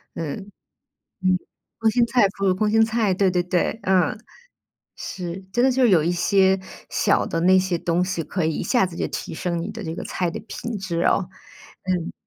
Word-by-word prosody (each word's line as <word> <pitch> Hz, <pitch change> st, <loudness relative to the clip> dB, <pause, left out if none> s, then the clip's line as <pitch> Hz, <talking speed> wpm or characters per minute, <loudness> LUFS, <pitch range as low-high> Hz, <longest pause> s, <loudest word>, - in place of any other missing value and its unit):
嗯， 160 Hz, -4 st, -3 dB
嗯， 205 Hz, -1 st, -10 dB, 1.3 s
空 225 Hz, -1 st, +3 dB
心 240 Hz, +1 st, +3 dB
菜 235 Hz, -3 st, +4 dB
腐 200 Hz, 0 st, -1 dB
乳 185 Hz, -, +3 dB
空 210 Hz, +3 st, 0 dB
心 225 Hz, +1 st, +5 dB
菜， 220 Hz, -3 st, +1 dB
对 195 Hz, 0 st, +2 dB
对 180 Hz, -1 st, +1 dB
对， 180 Hz, +4 st, 0 dB
嗯。 190 Hz, +2 st, +2 dB, 0.8 s
是， 180 Hz, -1 st, -6 dB
真 240 Hz, +4 st, +3 dB
的 265 Hz, -, +4 dB
就 260 Hz, -, +1 dB
是 240 Hz, -, +5 dB
有 165 Hz, -5 st, +5 dB
一 170 Hz, -, +1 dB
些 190 Hz, +2 st, +3 dB, 0.3 s
小 -, -, +2 dB
的 165 Hz, -, -2 dB
那 185 Hz, +2 st, +5 dB
些 185 Hz, -2 st, 0 dB
东 175 Hz, +2 st, +1 dB
西 175 Hz, -3 st, -2 dB
可 180 Hz, +1 st, -2 dB
以 160 Hz, -, 0 dB
一 -, -, -2 dB
下 245 Hz, -6 st, +2 dB
子 180 Hz, -2 st, -8 dB
就 -, -, -2 dB
提 -, -, -5 dB
升 170 Hz, +1 st, -2 dB
你 165 Hz, -, -4 dB
的 225 Hz, -, -7 dB
这 165 Hz, -2 st, -4 dB
个 -, -, -5 dB
菜 180 Hz, -2 st, -2 dB
的 -, -, -6 dB
品 230 Hz, 0 st, -6 dB
质 180 Hz, -3 st, -3 dB
哦。 180 Hz, +1 st, +2 dB, 0.7 s
嗯。 175 Hz, -2 st, -3 dB
185 Hz, 225 characters per minute, -23 LUFS, 175-215 Hz, 1.3 s, 心